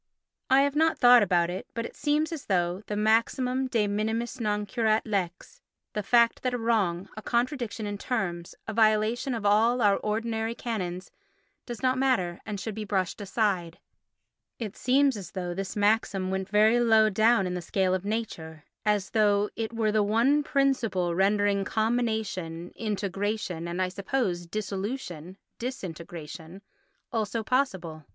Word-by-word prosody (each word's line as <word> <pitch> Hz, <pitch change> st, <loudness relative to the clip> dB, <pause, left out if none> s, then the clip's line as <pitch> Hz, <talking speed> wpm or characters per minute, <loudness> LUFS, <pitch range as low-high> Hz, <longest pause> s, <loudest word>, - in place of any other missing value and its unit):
I 265 Hz, +1 st, +6 dB
have 285 Hz, 0 st, +1 dB
not 320 Hz, +1 st, +3 dB
thought 245 Hz, -1 st, +7 dB
about 175 Hz, -3 st, +2 dB
it, 185 Hz, -, -6 dB
but 230 Hz, 0 st, -2 dB
it -, -, -8 dB
seems 300 Hz, +2 st, 0 dB
as 315 Hz, -4 st, -6 dB
though 180 Hz, -1 st, 0 dB
the 210 Hz, -, -3 dB
maxim 250 Hz, +5 st, +1 dB
de 230 Hz, -4 st, +1 dB
minimis 220 Hz, +5 st, -2 dB
non 210 Hz, -2 st, -1 dB
curat 220 Hz, 0 st, +1 dB
lex—the 210 Hz, -, -5 dB
fact 235 Hz, +3 st, +3 dB
that 250 Hz, -1 st, -1 dB
a -, -, -1 dB
wrong, 205 Hz, -6 st, 0 dB
a 215 Hz, -, -7 dB
contradiction 235 Hz, -3 st, -1 dB
in 205 Hz, -1 st, -4 dB
terms, 175 Hz, -9 st, -3 dB
a 220 Hz, -, -3 dB
violation 220 Hz, +4 st, +2 dB
of 220 Hz, -3 st, -5 dB
all 225 Hz, +4 st, +4 dB
our 205 Hz, -3 st, +4 dB
ordinary 225 Hz, +1 st, -2 dB
canons 185 Hz, -7 st, -4 dB, 0.6 s
does 240 Hz, +1 st, -7 dB
not 255 Hz, 0 st, +2 dB
matter 190 Hz, -11 st, +1 dB
and 210 Hz, -2 st, -4 dB
should 220 Hz, +3 st, -4 dB
be 215 Hz, +1 st, -5 dB
brushed 195 Hz, -1 st, -2 dB
aside—it 200 Hz, +2 st, -5 dB
seems 270 Hz, +1 st, +3 dB
as 185 Hz, -5 st, -9 dB
though 180 Hz, -3 st, -3 dB
this 190 Hz, +1 st, -5 dB
maxim 205 Hz, -2 st, +1 dB
went 190 Hz, 0 st, -2 dB
very 215 Hz, +3 st, +4 dB
low 220 Hz, -2 st, +5 dB
down 220 Hz, 0 st, +3 dB
in 180 Hz, -, -2 dB
the 180 Hz, -, -3 dB
scale 185 Hz, +2 st, 0 dB
of 185 Hz, 0 st, -1 dB
nature, 175 Hz, -8 st, -4 dB, 0.2 s
as 210 Hz, -2 st, 0 dB
though 205 Hz, -1 st, +2 dB
it 225 Hz, 0 st, -3 dB
were 225 Hz, -2 st, 0 dB
the 215 Hz, 0 st, +2 dB
one 230 Hz, +8 st, +3 dB
principle 245 Hz, -, +1 dB
rendering 200 Hz, +2 st, +2 dB
combination 215 Hz, -7 st, -1 dB
(integration) 200 Hz, -4 st, -3 dB
and, 170 Hz, +1 st, -4 dB
I 185 Hz, -1 st, +1 dB
suppose, 190 Hz, -3 st, -2 dB
dissolution 195 Hz, -, -5 dB, 0.2 s
(disintegration) 170 Hz, -, -7 dB, 0.5 s
also, 225 Hz, 0 st, -1 dB
possible. 190 Hz, -, -1 dB
210 Hz, 155 wpm, -27 LUFS, 190-235 Hz, 0.6 s, thought